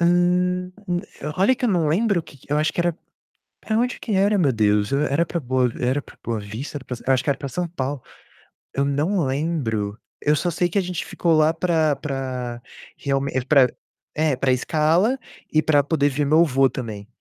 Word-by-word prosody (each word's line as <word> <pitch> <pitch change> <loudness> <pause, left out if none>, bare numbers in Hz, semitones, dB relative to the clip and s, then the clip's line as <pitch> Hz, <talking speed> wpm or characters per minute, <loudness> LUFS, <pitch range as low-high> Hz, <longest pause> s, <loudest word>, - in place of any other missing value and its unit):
hum, 180 +1 +2 0.6
olha 200 +8 +4
que 250 - -4
eu - - +3
não 170 -6 +2
lembro 195 +2 +2
o - - -12
que 145 - -15
que 140 - -8
eu 150 - +3
acho 155 +1 +1
que - - -1
era 175 -1 0 0.6
pra 220 - -1
onde 245 +1 0
que 220 - -4
era, 200 +1 +3
meu 145 -7 +3
Deus? 105 0 +2
Era 145 +3 +2
pra 170 - -3
Boa 130 -1 +1
era 130 +3 +1
pra - - -16
Boa 115 -2 -2
Vista? 110 +9 -6
Era 130 - -15
pra 125 - -5
eu 135 - +4
acho 130 0 -1
que - - +1
era 140 - 0
pra 140 - -5
São 175 +8 -2
Paulo. 140 -4 -4 0.7
Eu 140 0 +1
não 155 +5 +1
lembro. 130 -8 -1 0.2
Eu 150 +1 +3
só 175 +5 0
sei 175 +2 0
que 175 - -2
a 200 - +4
gente 180 -1 -4
ficou 170 -2 0
lá 155 +1 +4
pra 160 -3 +1
pra 130 -4 -4 0.4
realme 140 0 -1
pra 135 -3 +6 0.5
é, 155 -3 +2
pra 130 0 +1
escala 160 - +2 0.3
e 155 - +4
pra 145 -2 +3
poder 145 -1 +2
ver 145 +2 -1
meu 155 +4 +5
avô 135 -4 +4
também. 110 -6 -6
150 Hz, 210 wpm, -23 LUFS, 130-175 Hz, 0.7 s, pra